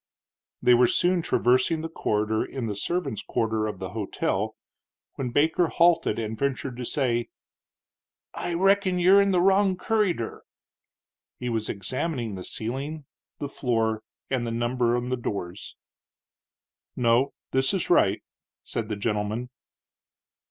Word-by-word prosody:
They 125 - +6
were 120 0 +6
soon 180 +5 +2
traversing 130 +1 +2
the 165 - -3
corridor 110 -7 0
in 130 -3 -5
the 105 -2 -3
servants' 170 - -2
quarter 110 -1 -1
of 105 -3 -5
the 95 0 -5
hotel, 105 -3 -2 0.6
when 130 -2 -3
Baker 160 +6 +2
halted 170 0 +3
and 110 -1 -3
ventured 135 0 -2
to 125 - -4
say: 120 -3 0 1.0
"I 175 - -3
reckin 195 0 +3
you'r 185 +3 +6
in 200 - +2
the 185 -2 +3
wrong 195 0 +4
curryder." 185 - 0 1.0
He 125 - -3
was 110 -2 -2
examining 120 - -3
the 95 -1 -6
ceiling, 135 +9 -4 0.3
the 145 - -4
floor, 115 -5 0 0.3
and 125 -3 -1
the - - -1
numbers 120 +1 +1
on 120 +1 -3
the 130 - 0
doors. 100 -5 -5 1.2
"No, 120 +3 +2 0.2
this 130 0 +2
is 190 -3 -1
right," 100 - +4 0.4
said 115 -2 -4
the 105 - -1
gentleman. 105 +3 -2
125 Hz, 140 wpm, -26 LUFS, 110-165 Hz, 1.2 s, They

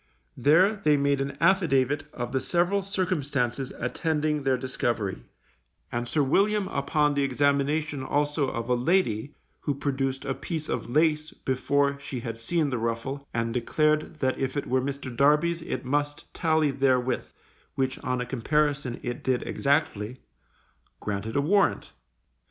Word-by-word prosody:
There 180 - +4
they 150 -6 +3
made 140 0 +2
an 140 0 -4
affidavit 145 -6 +3
of 120 0 -5
the 130 - 0
several 175 +7 +1
circumstances 145 - -1
attending 150 +3 -1
their 135 -1 +2
discovery, 120 - -2 0.7
and 120 0 -2
Sir 150 +3 +1
William 200 +8 +2
upon 150 +1 +1
the 145 - +1
examination 140 +2 +1
also 145 +1 0
of 115 -2 -4
a 125 - +2
lady 130 - +1 0.2
(who 145 - -2
produced 135 -1 -2
a 135 - 0
piece 160 +2 -4
of - - -3
lace 155 +2 +2
before 140 +1 0
she 135 -3 -5
had 115 -1 -5
seen 150 +4 0
the 125 - -1
ruffle, 115 +5 -3
and 115 0 -1
declared 155 +6 +1
that 130 0 +1
if 135 +1 -2
it 145 - -1
were 130 0 +1
Mr. 135 -2 -4
Darby's 150 +6 +3
it 160 - -4
must 145 +2 -2
tally 160 -3 +2
therewith, 130 -2 +1 0.4
which 130 0 -1
on 125 -1 -2
a - - -2
comparison 140 +1 0
it 120 +4 -4
did 130 -2 0
exactly) 130 -6 0 0.8
granted 105 +2 -4
a 140 - +3
warrant. 195 +7 +2
140 Hz, 150 wpm, -27 LUFS, 125-150 Hz, 0.8 s, There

